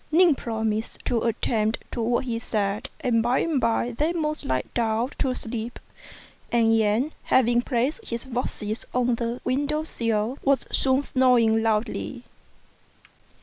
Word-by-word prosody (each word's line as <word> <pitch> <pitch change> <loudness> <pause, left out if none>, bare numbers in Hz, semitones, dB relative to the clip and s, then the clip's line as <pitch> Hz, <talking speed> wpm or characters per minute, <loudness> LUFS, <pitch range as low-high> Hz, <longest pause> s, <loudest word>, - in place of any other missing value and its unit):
Ning 340 0 +6
promised 220 -3 -2
to 235 -2 +1
attend 220 -1 0
to 240 - -3
what 240 +3 +1
he 230 -2 -2
said, 215 +2 -2
and 230 -2 +2
by 240 +3 +2
and 310 -6 +1
by 230 +1 +1
they 300 +8 0
both 305 -2 -2
lay 130 0 0
down 230 +2 0
to 255 -2 +1
sleep; 230 0 -5 0.7
and 225 -1 +4
Yen, 225 +7 +2
having 240 -1 +4
placed 260 - -1
his 235 +2 -5
boxes 235 -4 -3
on 250 -1 +2
the 235 +1 -2
window 290 +4 0
sill, 230 -3 -1
was 275 -1 +2
soon 265 +1 +2
snoring 245 -5 +3
loudly. 225 +3 -1
235 Hz, 145 wpm, -25 LUFS, 225-260 Hz, 0.7 s, Ning